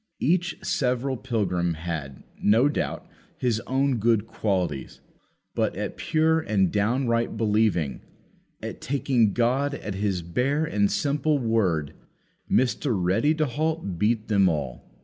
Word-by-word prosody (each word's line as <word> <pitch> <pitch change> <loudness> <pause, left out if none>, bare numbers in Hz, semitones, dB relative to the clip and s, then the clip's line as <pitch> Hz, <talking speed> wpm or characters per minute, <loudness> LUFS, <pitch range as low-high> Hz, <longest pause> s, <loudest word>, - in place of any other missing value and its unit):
Each 175 +2 +1
several 130 -6 0
pilgrim 90 -8 -1
had, 80 -5 -5 0.2
no 115 +6 +4
doubt, 145 - -3 0.3
his 120 -3 0
own 135 0 +1
good 110 -1 +2
qualities; 95 -10 -2 0.5
but, - - 0
at - - -4
pure 160 +1 +2
and 100 - +1
downright 115 +2 0
believing 105 - +1 0.6
at - - -6
taking 130 -5 +1
God 130 +6 +1
at 105 - -5
His 95 -3 -1
bare 135 - 0
and 100 -8 +1
simple 150 +1 +1
word 100 - 0 0.6
Mr. 125 -2 +1
Ready 105 - +2
to 155 0 +1
halt 150 - -2
beat 110 +2 +1
them 100 -3 +4
all. 70 -8 -4
115 Hz, 130 wpm, -25 LUFS, 95-135 Hz, 0.6 s, no